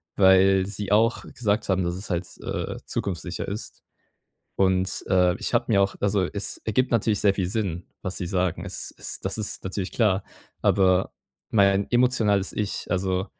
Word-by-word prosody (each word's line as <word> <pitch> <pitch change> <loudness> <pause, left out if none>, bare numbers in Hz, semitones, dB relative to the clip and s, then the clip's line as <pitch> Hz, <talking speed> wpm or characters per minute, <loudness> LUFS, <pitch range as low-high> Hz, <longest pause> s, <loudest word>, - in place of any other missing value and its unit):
weil 95 0 +5
sie 100 0 -4
auch 115 +3 +3
gesagt 110 -4 -1
haben, 95 -1 +2
dass 85 0 -1
es 95 - -7
halt, 90 0 -1 0.2
äh, - - -4
zukunftssicher 90 -2 -3
ist. 105 +3 -7 0.7
Und, 95 -1 +1
äh, 90 -1 +3
ich - - -3
habe - - +2
mir 100 - +4
auch 95 0 +1
also 100 -2 +2
es 100 +3 -4
ergibt 125 +4 +1
natürlich 110 -2 +1
sehr 100 -2 +4
viel 95 -3 -1
Sinn, 95 -4 -2 0.2
was 95 -2 -4
sie 90 - -3
sagen. 90 -1 -1
Es - - -5
ist - - -7
das - - -2
ist 110 - -3
natürlich 95 0 -3
klar, 100 -4 +2 0.4
aber 95 -1 +3 0.4
mein 100 -1 +3
emotionales 115 -6 +2
Ich, 105 -2 -3
also 95 +1 0
95 Hz, 170 wpm, -25 LUFS, 95-105 Hz, 0.7 s, weil